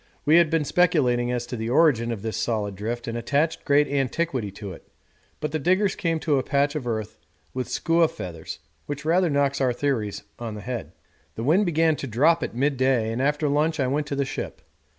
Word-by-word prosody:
We 155 +3 +6
had 170 -2 +5
been 160 -2 +1
speculating 135 -9 +2
as 120 -1 -2
to 120 - -5
the 110 0 -3
origin 125 -4 +3
of 110 -3 -5
this 110 -3 -3
solid 105 -3 -1
drift 115 +5 -4
and 115 - -3
attached 145 +7 0
great 145 0 +4
antiquity 135 -3 -1
to 100 -2 -7
it, - - -14 0.5
but 150 - -3
the 155 - -1
diggers 185 +6 +2
came 165 -1 -1
to 145 -4 +2
a - - -2
patch 140 +2 +1
of 145 -6 -4
earth 110 -2 -3 0.3
with 130 -1 -3
skua 165 0 +2
feathers, 85 - -7 0.3
which 145 +1 -5
rather 175 +2 +3
knocks 140 -1 +1
our 130 -2 +2
theories 120 -6 -2 0.2
on 115 -3 -5
the 105 - -7
head. 120 +4 -5 0.4
The 115 - -4
wind 175 - +3
began 160 -1 +3
to 135 - -5
drop 155 +8 +3
at - - -4
midday, 130 -4 +1
and 115 +3 -2
after 150 +2 +1
lunch 150 +2 +1
I 135 - +2
went 145 +3 -1
to 140 - -3
the 140 0 0
ship. - - -6
140 Hz, 210 wpm, -25 LUFS, 120-155 Hz, 0.5 s, We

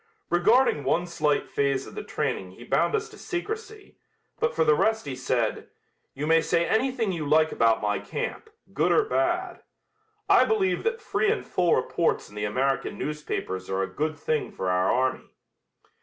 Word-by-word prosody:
Regarding 175 - +3
one 165 +6 +1
slight 150 -4 0
phase 140 -1 0
of - - -11
the 425 - -6
training - - -3
he - - -13
bound - - +1
us 440 0 -2
to 420 - -14
secrecy, 425 +3 -6 0.4
but 465 +1 0
for - - +3
the 155 - +5
rest 220 +6 +1
he 135 -2 -4
said: 125 -3 -1 0.5
"You 145 - -3
may 165 +1 +4
say 170 +1 +1
anything 230 -1 +1
you 165 -4 -3
like 155 +1 +4
about 115 -1 +2
my 105 -1 0
camp, 440 - -5 0.2
good - - +2
or 440 - +4
bad. 350 -1 -1 0.7
I - - +6
believe 405 -4 +1
that 455 0 -1
free 430 -1 +1
and 460 - -2
full 175 -2 +2
reports 165 +6 0
in - - -17
the 105 0 -2
American 135 +6 -1
newspapers 145 -11 -4
are 95 0 0
a - - -6
good 155 +1 -1
thing 155 +1 -1
for 95 -1 -2
our 90 +1 +2
army." 130 +1 0
160 Hz, 180 wpm, -26 LUFS, -, 0.7 s, I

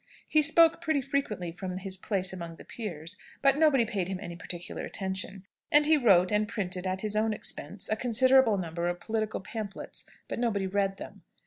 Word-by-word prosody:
He 310 - +4
spoke 330 +2 +5
pretty 315 -4 +1
frequently 235 - -2
from 185 +1 -5
his 190 0 -4
place 190 -1 -2
among 170 -2 -7
the - - -14
peers, 175 -5 -6 0.3
but 275 +1 +4
nobody 285 -7 +5
paid 200 -5 -2
him 190 -1 -4
any 175 -1 -7
particular 175 0 -6
attention. 190 0 -3 0.3
And 295 0 +6
he 315 +1 +6
wrote 195 -9 +5
and 210 0 +2
printed, 185 -4 -2
at 185 +1 -2
his 215 -1 -3
own 220 +1 +2
expense, 205 -1 -4
a 215 - +1
considerable 250 0 +4
number 170 -1 -3
of 175 0 -3
political 220 +1 -2
pamphlets; 210 0 -7 0.2
but - - -4
nobody 215 -5 0
read 195 0 0
them. - - -10
205 Hz, 190 wpm, -29 LUFS, 185-240 Hz, 0.3 s, And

